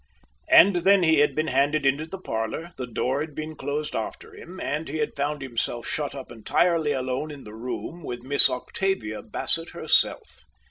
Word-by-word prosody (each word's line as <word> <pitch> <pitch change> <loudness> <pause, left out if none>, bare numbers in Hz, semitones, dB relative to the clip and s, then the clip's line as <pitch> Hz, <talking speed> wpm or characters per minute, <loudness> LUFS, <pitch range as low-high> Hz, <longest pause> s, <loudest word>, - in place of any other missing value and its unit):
And 190 +1 +7
then 190 +2 +4
he 160 -2 +4
had 145 - +3
been 155 - +1
handed 140 +3 +2
into 140 +4 +2
the 190 - -6
parlor, 115 - -4
the 125 - -5
door 130 +4 -1
had 155 -2 -5
been 155 0 -5
closed 145 +2 -3
behind - - -3 0.2
him, 185 +2 -11
and 150 0 -3
he 155 - -3
had 150 -1 -2
found 145 0 -2
himself 120 -2 -3
shut 145 -2 -3
up 135 -3 -8
entirely 155 +7 +1
alone 130 +2 -2
in 145 -2 -9
the 105 - -11
room 125 +9 -6
with 120 -5 -6
Miss 140 +1 +5
Octavia 125 - -2
Bassett - - -1
herself. - - +1
145 Hz, 185 wpm, -25 LUFS, 130-160 Hz, 0.2 s, And